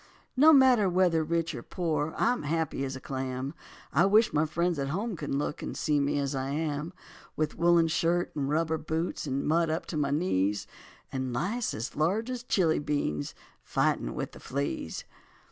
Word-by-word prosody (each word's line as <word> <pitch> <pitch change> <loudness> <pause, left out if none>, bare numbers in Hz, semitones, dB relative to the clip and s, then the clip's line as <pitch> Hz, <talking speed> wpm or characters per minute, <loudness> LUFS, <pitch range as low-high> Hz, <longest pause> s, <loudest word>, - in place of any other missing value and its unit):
No 300 +5 +7
matter 255 -8 +6
whether 175 -3 +3
rich 165 +1 -1
or - - -5
poor, 160 -3 -2
I'm 245 +1 +2
happy 155 -2 -1
as 135 0 -3
a - - -6
clam. 130 +1 -4 0.4
I 170 +6 +5
wish 215 +3 +4
my 155 +1 +2
friends 170 +1 0
at 135 - -1
home 200 +8 -2
could - - -6
look 145 +3 -2
And - - -5
see 150 -2 +1
me 140 +1 +1
as 140 0 -1
I 135 0 -2
am. 150 +2 -2 0.4
With 155 -1 -1
woolen 170 0 +4
shirt 170 +2 0
and 140 -2 -1
rubber 160 +1 +1
boots, 160 +1 -3
In 135 0 -1
mud 165 +1 +2
up 160 +2 -2
to 160 - -4
my 145 -2 +1
knees, 105 - 0 0.5
And 130 -2 -2
lice 205 - -1
as 115 +4 -5
large 200 +11 0
as 250 -2 -4
chili 180 -9 +2
beans 140 - -2 0.3
Fighting - - 0
with - - -4
the - - -13
fleas. 140 - -3
155 Hz, 185 wpm, -29 LUFS, 140-175 Hz, 0.5 s, No